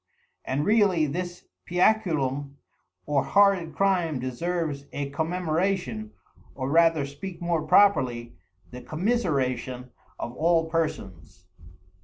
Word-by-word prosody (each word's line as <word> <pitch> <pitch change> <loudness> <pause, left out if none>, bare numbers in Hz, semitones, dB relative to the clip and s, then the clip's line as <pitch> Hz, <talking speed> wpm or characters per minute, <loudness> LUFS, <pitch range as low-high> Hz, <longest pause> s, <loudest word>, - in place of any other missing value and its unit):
And 140 +3 -1
really 200 -7 +3
this 175 +4 -5 0.2
Piaculum 155 -8 +1 0.5
or 145 -3 +1
horrid 190 +2 +3
Crime 180 -7 +1
deserves 145 +2 -3
a 140 -1 -4
Commemoration, 160 - -1 0.5
or 130 0 -3
rather 165 -2 +4
speak 165 +6 -8
more 170 -2 0
properly, 125 -11 +3 0.4
the 125 0 -8
Commiseration 135 - -1 0.3
of 120 - -5
all 165 +1 +2
Persons." 95 - -4
155 Hz, 100 wpm, -26 LUFS, 130-180 Hz, 0.5 s, rather